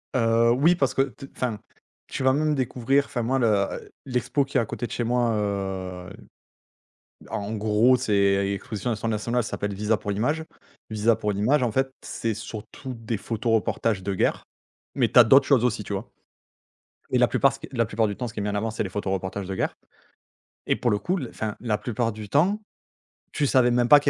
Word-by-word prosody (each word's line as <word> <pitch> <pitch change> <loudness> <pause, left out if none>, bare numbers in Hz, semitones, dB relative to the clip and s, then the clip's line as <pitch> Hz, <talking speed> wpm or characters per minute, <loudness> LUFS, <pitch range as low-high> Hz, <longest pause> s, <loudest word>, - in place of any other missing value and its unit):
Heu, 115 -1 +4
oui, 150 +7 +4
parce 135 -7 +1
que 135 - +4
t 135 0 -9
enfin, 120 -5 -2 0.5
tu - - -4
vas 130 0 +4
même 150 +1 +1
découvrir, 130 +1 +1
enfin, 125 - -3
moi, 130 +4 +1
le, 120 - +2
heu, 100 -2 0
l'expo 125 +1 0
qui 135 - -2
est - - +4
à - - -1
côté 120 +2 -4
de - - -14
chez 120 - -1
moi, 120 0 +1
heu, 95 -3 -3 1.2
en 100 +1 -4
gros, 110 +4 +3
c'est 100 -4 +2
l'exposition 100 +4 -3
natio 110 0 -3
nationale 115 +3 0
ça - - -5
s'appelle 100 0 -2
Visa 105 +2 +1
pour 105 - -4
l'image 145 +11 0 0.4
Visa 110 +1 +2
pour 105 -2 -1
l'image, 125 +8 +2
en 120 - +1
fait, 135 +4 0
c'est 115 -1 -3
surtout 115 +5 -7
des 115 -2 -4
photos 115 +3 -2
reportages 110 -2 0
de 100 - -1
guerre, 95 - 0 0.5
mais - - +2
tu - - +7
as 120 - +11
d'autres 135 +5 +6
choses 130 -4 +4
aussi, 110 -3 0
tu 105 - -9
vois? 100 +4 -4 1.0
Et - - +1
la 125 - +6
plupart, 135 +2 +3
ce - - -9
qui - - -9
la 115 -3 +1
plupart 110 0 +1
du 100 - -3
temps, 125 - -3
ce 115 - -11
qui - - -4
est - - -1
mis 105 - -1
en - - -3
avant 110 +2 -1
c'est 110 - -2
les 95 - -5
photos 100 0 -2
reportages 95 +1 -4
de 95 - -4
guerre - - -1 0.9
et - - +2
pour 120 - 0
le 105 - +2
coup, 180 - -1
le 130 -10 -4
enfin 110 -2 -4
la 110 -4 0
plupart 115 +1 -1
du 105 -1 -8
temps, 180 - +2 0.7
tu 145 - 0
savais 130 -2 +4
même 120 0 +2
pas 145 +3 +9
qu'il 140 0 +1
115 Hz, 225 wpm, -25 LUFS, 105-130 Hz, 1.2 s, as